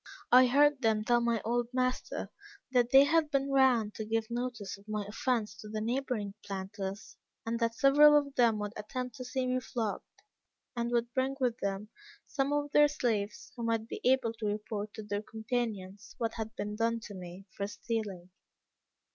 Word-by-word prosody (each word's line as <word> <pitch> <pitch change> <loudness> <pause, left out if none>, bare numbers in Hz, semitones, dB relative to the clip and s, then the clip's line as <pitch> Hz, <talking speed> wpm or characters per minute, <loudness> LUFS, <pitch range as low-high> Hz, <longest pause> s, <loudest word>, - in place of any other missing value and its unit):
I 255 +1 +8
heard 290 +2 +4
them 220 -2 +2
tell 240 +1 +3
my 235 -2 0
old 240 +1 0
master 255 0 -1 0.4
that 245 -2 +3
they 270 +2 +8
had 310 +1 +2
been 275 -1 0
round 250 -6 +4
to 220 - -5
give 220 +1 -2
notice 240 -4 -3
of 200 +1 -19
my 210 -1 -2
offence 225 +1 -1
to 215 - -10
the 215 0 -3
neighboring 230 -3 -2
planters, 195 0 -6 0.3
and 230 +1 -2
that 230 -1 0
several 295 +4 +7
of 285 -1 -1
them 235 -4 +3
would 210 0 -4
attend 250 +4 -5
to 255 - -7
see 255 +1 -2
me 255 0 +1
flogged, 230 -4 -5 0.5
and 235 0 -1
would 240 0 0
bring 265 +1 0
with 250 -2 0
them 200 +1 -3 0.4
some 275 0 -1
of 290 0 0
their 295 0 +6
slaves, 225 -8 -2
who 240 - -7
might 225 -1 0
be - - -6
able 250 -3 +3
to 215 - -1
report 210 0 -3
to 215 - -6
their 205 0 -3
companions 220 -4 -4
what 230 -1 -1
had 220 -1 -5
been 210 0 -4
done 230 +1 +1
to 210 - -9
me 180 0 -9
for 200 - -2
stealing. 205 -5 -4
230 Hz, 185 wpm, -31 LUFS, 210-255 Hz, 0.5 s, I